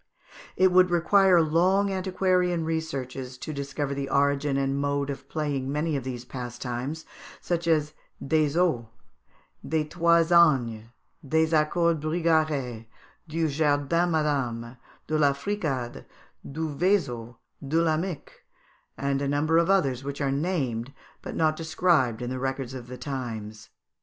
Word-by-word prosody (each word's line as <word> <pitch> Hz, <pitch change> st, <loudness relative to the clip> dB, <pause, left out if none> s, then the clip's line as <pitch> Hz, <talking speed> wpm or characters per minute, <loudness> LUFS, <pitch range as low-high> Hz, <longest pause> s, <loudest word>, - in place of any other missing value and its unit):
It 185 Hz, 0 st, +5 dB
would 180 Hz, 0 st, +5 dB
require 175 Hz, 0 st, +4 dB
long 185 Hz, +6 st, +2 dB
antiquarian 185 Hz, -2 st, +1 dB
researches 135 Hz, -6 st, -4 dB
to 155 Hz, -, -6 dB
discover 140 Hz, 0 st, -3 dB
the 140 Hz, 0 st, -4 dB
origin 140 Hz, 0 st, +1 dB
and 135 Hz, 0 st, 0 dB
mode 140 Hz, 0 st, -1 dB
of 135 Hz, 0 st, -9 dB
playing 140 Hz, -4 st, -2 dB
many 150 Hz, +2 st, -1 dB
of 135 Hz, -, -2 dB
these 125 Hz, -1 st, -6 dB
pastimes, 125 Hz, +4 st, -5 dB, 0.3 s
such 170 Hz, -1 st, -2 dB
as 155 Hz, -2 st, +2 dB, 0.3 s
des 155 Hz, +1 st, +1 dB
oes, 160 Hz, -10 st, +2 dB, 0.8 s
des 160 Hz, -1 st, 0 dB
trois 170 Hz, +2 st, +3 dB
ânes, 130 Hz, -10 st, +4 dB, 0.4 s
des 160 Hz, +3 st, +1 dB
accords 160 Hz, +1 st, +2 dB
bigarrés, 155 Hz, -8 st, 0 dB, 0.4 s
du 165 Hz, +1 st, 0 dB
jardin 150 Hz, +3 st, +1 dB
madame, 130 Hz, -7 st, -1 dB, 0.3 s
de 155 Hz, 0 st, -1 dB
la 140 Hz, -2 st, +4 dB
fricade, 140 Hz, -, -3 dB, 0.5 s
du 160 Hz, +3 st, -3 dB
feiseau, 135 Hz, -, 0 dB, 0.3 s
de 150 Hz, +4 st, +1 dB
la 165 Hz, -2 st, +2 dB
mick, 165 Hz, -2 st, -5 dB, 0.5 s
and 140 Hz, 0 st, -1 dB
a 140 Hz, -, -1 dB
number 150 Hz, +4 st, +2 dB
of 170 Hz, +2 st, +1 dB
others 135 Hz, -10 st, +2 dB
which 140 Hz, 0 st, -5 dB
are 140 Hz, -2 st, 0 dB
named 135 Hz, -6 st, -1 dB, 0.3 s
but -, -, -7 dB
not 155 Hz, -1 st, +2 dB
described 155 Hz, -7 st, +1 dB
in 120 Hz, -, -4 dB
the 130 Hz, -, -3 dB
records 135 Hz, -1 st, -3 dB
of 125 Hz, -2 st, -8 dB
the 125 Hz, 0 st, -8 dB
times. 110 Hz, -6 st, -6 dB
145 Hz, 140 wpm, -26 LUFS, 135-165 Hz, 0.8 s, It